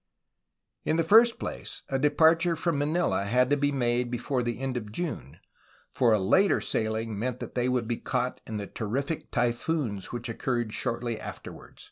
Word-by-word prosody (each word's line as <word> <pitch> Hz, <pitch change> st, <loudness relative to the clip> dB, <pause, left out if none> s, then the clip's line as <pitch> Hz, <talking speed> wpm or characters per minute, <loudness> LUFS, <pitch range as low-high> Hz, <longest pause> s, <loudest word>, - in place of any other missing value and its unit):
In 155 Hz, -, +1 dB
the 165 Hz, -, +2 dB
first 230 Hz, +7 st, +6 dB
place, -, -, -6 dB
a 135 Hz, -, -1 dB
departure 160 Hz, +4 st, +4 dB
from 165 Hz, -2 st, -1 dB
Manila 155 Hz, -, +1 dB
had 125 Hz, +5 st, +2 dB
to -, -, +6 dB
be 145 Hz, 0 st, +1 dB
made 120 Hz, -2 st, 0 dB
before 125 Hz, +2 st, -1 dB
the 120 Hz, 0 st, -3 dB
end 135 Hz, -1 st, -2 dB
of 105 Hz, -4 st, -4 dB
June, 95 Hz, -, -5 dB, 0.6 s
for 120 Hz, -3 st, +3 dB
a 110 Hz, -, +5 dB
later 190 Hz, -, +3 dB
sailing 110 Hz, -1 st, -2 dB
meant 125 Hz, +2 st, -2 dB
that -, -, -7 dB
they 125 Hz, 0 st, 0 dB
would 125 Hz, -3 st, 0 dB
be 120 Hz, -1 st, -1 dB
caught 125 Hz, -1 st, -2 dB
in 110 Hz, -, -4 dB
the 100 Hz, -, -4 dB
terrific 135 Hz, +10 st, -3 dB
typhoons 120 Hz, -, -1 dB
which 120 Hz, 0 st, -4 dB
occurred 120 Hz, -1 st, -2 dB
shortly 120 Hz, -2 st, -2 dB
afterward. -, -, -9 dB
125 Hz, 175 wpm, -28 LUFS, 115-145 Hz, 0.6 s, first